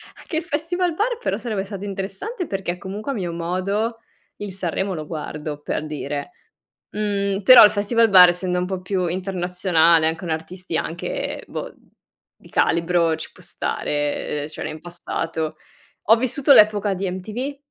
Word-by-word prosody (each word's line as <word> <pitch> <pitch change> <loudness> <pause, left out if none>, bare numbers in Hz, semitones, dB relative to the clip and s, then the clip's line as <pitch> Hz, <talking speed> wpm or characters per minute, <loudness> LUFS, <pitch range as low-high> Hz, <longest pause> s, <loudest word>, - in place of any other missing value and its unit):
Anche 320 - -5
il 330 - -1
Festivalbar 355 +8 -1
però - - -1
sarebbe 215 -5 -3
stato 200 -1 -7
interessante 200 - -5
perché 195 -3 -2
è - - -11
comunque 200 +8 -5
a 270 - -3
mio 175 -4 -3
modo, 190 +7 -1 0.4
il 205 -2 -6
Sanremo 190 +1 -2
lo 155 - -5
guardo, 150 -1 -5
per 150 - -3
dire. 145 - -5 0.6
Mhmm, 200 -1 -1
però 255 +4 +10
il 210 - +8
Festivalbar 205 -3 +6
essendo 180 +1 -1
un 180 - -1
po' 190 -1 -4
più 185 0 -1
internazionale 175 -3 +2
e 160 - -2
con 165 +1 -7
artisti 165 +2 -4
anche, - - -4
boh, - - -6 0.7
di - - -17
calibro, 170 -1 +2
ci - - -7
può - - -16
stare, 145 0 -2
ehm, - - -5
cioè 155 - -8
nel 155 - -6
passato. 165 -2 -4 0.5
Ho 220 +4 +6
vissuto 260 +4 +3
l'epoca 210 -3 +5
di 190 0 -2
MTV, 220 +10 -5
190 Hz, 160 wpm, -22 LUFS, 170-215 Hz, 0.7 s, però